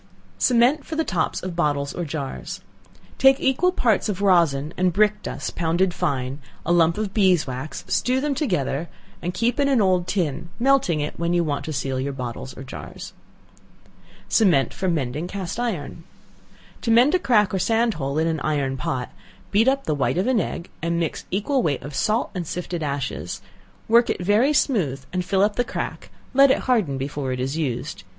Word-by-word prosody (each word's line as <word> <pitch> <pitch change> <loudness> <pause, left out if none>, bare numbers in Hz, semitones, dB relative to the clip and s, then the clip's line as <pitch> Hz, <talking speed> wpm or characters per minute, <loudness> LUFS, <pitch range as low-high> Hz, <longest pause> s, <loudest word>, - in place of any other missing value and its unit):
Cement 255 +4 +3
for 320 - -6
the 320 - +1
Tops 175 - -1
of 185 -2 -4
Bottles 145 -4 0
or 175 - -3
Jars. 145 -3 -5 0.6
Take 270 +1 +6
equal 270 +8 +2
parts 225 - +1
of 195 -2 -2
rosin 165 -6 +3
and 185 0 +2
brick 210 +3 +2
dust - - -5
pounded 175 +2 +1
fine; 140 -6 -2 0.3
a 170 - 0
lump 170 0 +4
of 210 -2 -3
beeswax; 155 - +1
stew 255 +1 +1
them 290 +1 0
together, 170 - -1 0.3
and 175 - -2
keep 240 +4 0
in 280 - +3
an 270 -3 +3
old 185 -3 +2
tin, 170 -4 -2
melting 250 - +2
it 150 - -4
when 170 +1 0
you 175 - +3
want 145 -3 -2
to 160 - -4
seal 135 -2 -2
your 140 +1 -2
bottles 130 0 -6
or 135 - -7
jars. 130 - -9 1.1
Cement 170 - +3
for 190 - -3
Mending 150 0 -2
Cast 190 +2 -5
iron. 170 -9 -3 0.8
To 235 - -3
mend 240 +7 +5
a 370 - +4
crack 210 - +3
or 190 - +1
sand 225 +3 +2
hole 140 -2 -3
in 160 - +2
an 160 -1 0
iron 140 -3 -1
pot, 125 -1 -3 0.4
beat 215 +4 +3
up 275 +1 +2
the 155 - -1
white 145 +3 0
of 185 - +1
an 255 -3 +2
egg, 170 - -4
and 170 +1 0
mix 165 -2 -3
equal 230 +8 0
weight 145 - -1
of 145 - -7
salt 215 - 0
and 180 -4 -4
sifted 175 0 -4
ashes; 140 -2 -3 0.5
work 235 +1 +5
it - - -1
very 215 +9 +4
smooth 170 - +1
and 180 -1 0
fill 190 +1 +2
up 205 0 +1
the 245 - +3
crack, - - -5 0.2
let 275 +1 +7
it - - +3
harden 210 - +1
before 135 0 -3
it 125 - -3
is 135 +3 -2
used. 135 -4 -3
175 Hz, 190 wpm, -23 LUFS, 145-225 Hz, 1.1 s, let